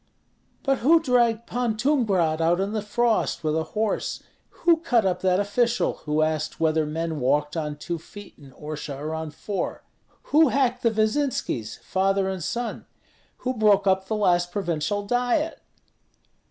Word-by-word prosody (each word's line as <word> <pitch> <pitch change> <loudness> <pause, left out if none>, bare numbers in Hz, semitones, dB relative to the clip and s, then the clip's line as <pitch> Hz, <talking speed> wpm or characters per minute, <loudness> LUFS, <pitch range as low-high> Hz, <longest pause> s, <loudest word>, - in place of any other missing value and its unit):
"But 270 -2 +1
who 320 +7 +5
dragged 240 -6 +2
Pan 240 -3 -1
Tumgrat 205 - +1
out 170 +2 +2
in 195 +2 -1
the 215 - -1
frost 225 0 0
with 155 0 0
a 160 - +1 0.2
horse; 220 -1 -1 0.4
who 340 -1 +6
cut 245 - +1
up 185 -2 0
that 185 0 +2
official, 230 +4 +1
who 150 +1 +1
asked 155 -1 -2
whether 160 -1 +2
men 160 0 -3
walked 145 +4 +1
on 150 -2 -3
two 170 +3 -5
feet 205 +5 -12
in 140 -2 -15
Orsha 150 -2 -6
or 155 +3 -4
on 160 0 -4
four? 195 +6 -4 0.5
Who 315 +1 +7
hacked 255 -1 +1
the 230 - +3
Vyzinskis, 220 - -1
father 195 0 +1
and 190 -3 -3
son? 240 +6 -4 0.6
Who 255 - +1
broke 210 -4 +3
up 190 0 +2
the 220 - -1
last 175 -4 +2
provincial 190 +2 -2
Diet?" 245 +8 0
200 Hz, 160 wpm, -25 LUFS, 160-240 Hz, 0.6 s, Who